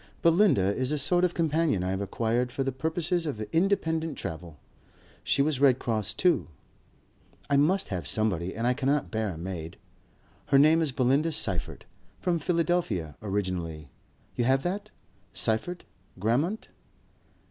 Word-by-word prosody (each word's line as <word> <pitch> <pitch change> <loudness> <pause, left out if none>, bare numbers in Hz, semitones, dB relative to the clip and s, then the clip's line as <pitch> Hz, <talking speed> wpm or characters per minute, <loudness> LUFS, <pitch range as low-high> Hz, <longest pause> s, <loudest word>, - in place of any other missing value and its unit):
Belinda 165 - +4
is 130 +1 -1
a 150 - 0
sort 175 +6 +3
of 180 -1 +1
companion 160 - +1
I 90 - -1
have 95 +1 -2
acquired 115 +4 -1
for 135 - -2
the 135 - -1
purposes 165 +5 -1
of 135 -8 -4
independent 165 -3 +1
travel. 80 -1 -6 0.7
She 140 - +2
was 150 -3 0
Red 135 -3 +5
Cross 110 -6 -2
too. 180 -2 +2 1.0
I 140 - +5
must 180 +7 +2
have 90 -4 -4
somebody 95 -5 -1
and 115 +2 -2
I 125 - +3
cannot 140 +2 0
bear 110 -2 -1
a 85 - -6
maid. 85 -1 -6 0.7
Her 140 - +4
name 155 +4 +5
is 155 -4 0
Belinda 135 +6 +2
Seyffert. - - -2 0.3
From 175 -2 0
Philadelphia 165 - 0
originally. 90 -7 -3 0.5
You 120 - 0
have 135 +2 +2
that? 195 +4 -3 0.5
Seyffert, 120 +11 -1 0.3
Grammont?" 140 - 0
135 Hz, 145 wpm, -27 LUFS, 100-165 Hz, 1.0 s, Red